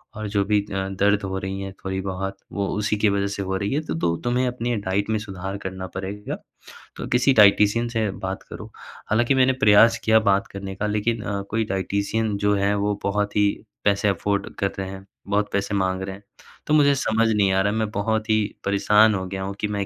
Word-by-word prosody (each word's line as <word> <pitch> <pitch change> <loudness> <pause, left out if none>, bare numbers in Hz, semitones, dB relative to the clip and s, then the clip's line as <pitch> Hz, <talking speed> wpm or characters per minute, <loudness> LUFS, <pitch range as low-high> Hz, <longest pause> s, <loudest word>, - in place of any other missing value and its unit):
और 110 -1 -4
जो 100 -1 +1
भी 105 0 +2
अ, 95 0 -1
दर्द 100 +1 +1
हो 95 0 -3
रही 95 +1 -4
हैं 95 -1 -6
थोड़ी-बहुत, 95 0 -3
वो 100 -1 -2
उसी 105 0 0
की 105 0 +3
वज़ह 100 0 0
से - - -4
हो 95 0 -2
रही 100 +5 -2
हैं। 155 +2 0
तो - - -3
तो 85 -1 +1
तुम्हें 125 +1 +1
अपनी 120 -1 -2
डाइट 100 +1 -1
में 110 - +1
सुधार 95 -1 -6
करना 95 0 -6
पड़ेगा। 100 +2 -5 0.6
तो - - -5
किसी 125 +2 +3
डाइटिशियन 105 +2 +5
से 110 -3 0
बात 95 0 -5
करो। - - -10 0.4
हालाँकि 120 +5 +2
मैंने 130 0 +4
प्रयास 110 +3 +6
किया 110 0 +5
बात 100 0 +1
करने 100 -1 -7
का, 105 +2 -2
लेकिन 105 +2 -1
अ, 100 -1 -3
कोई 110 0 0
डाइटिशियन 100 +2 -1
जो 105 0 +2
हैं, 100 +1 +1
वो 105 0 -1
बहुत 100 +1 -1
ही 105 0 +4 0.4
पैसे 100 0 +2
अफ़ोर्ड 100 +1 -1
कर 100 -1 -1
रहे 95 -1 -3
हैं, 95 0 -9 0.2
बहुत 105 +1 0
पैसे 100 +1 -1
माँग 95 -1 0
रहे 95 0 -5
हैं। 100 - -16 0.4
तो 150 - +1
मुझे 145 -2 +5
समझ 115 -3 +1
नहीं 100 -3 +2
आ 95 - +3
रहा 100 +1 +1
है, - - -2
मैं 110 -1 -1
बहुत 110 +1 -1
ही 110 - +4 0.3
परेशान 105 +2 +4
हो 95 - -3
गया 95 0 -4
हूँ 100 +1 -4
कि 105 - +1
मैं 100 - -1
100 Hz, 225 wpm, -23 LUFS, 95-110 Hz, 0.6 s, प्रयास